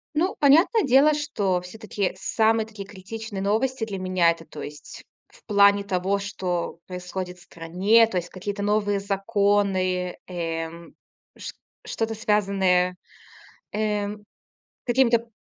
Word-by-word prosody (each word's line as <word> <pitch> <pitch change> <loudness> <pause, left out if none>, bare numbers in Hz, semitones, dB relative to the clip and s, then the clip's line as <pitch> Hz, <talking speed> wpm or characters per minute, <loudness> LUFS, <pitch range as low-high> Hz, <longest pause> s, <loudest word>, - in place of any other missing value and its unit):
Ну, 350 +5 +1
понятное 330 - +5
дело, 275 +2 +5
что 210 -12 -1
всё-таки 205 +1 -3
самые 220 0 +1
такие 215 -3 -9
критичные 205 +1 -7
новости 225 +5 0
для 200 -3 -5
меня- 185 -2 +3
это, 165 0 -8
то 150 - -10
есть 145 +1 -9 0.2
в - - -22
плане 200 -1 +5
того, 195 0 0
что 180 -4 -3
происходит 180 0 -6
в 175 - -17
стране, 185 +8 +3
то 195 - -3
есть 175 0 -3
какие-то 200 +2 -5
новые 205 -1 +1
законы, 195 -2 0
эм, 165 -1 -5 0.4
ш - - -7 0.3
что-то 225 0 -2
связанное, 195 -4 +2 0.8
э, 210 -1 0 0.8
какими-то 235 -2 +2
200 Hz, 125 wpm, -24 LUFS, 180-220 Hz, 0.8 s, понятное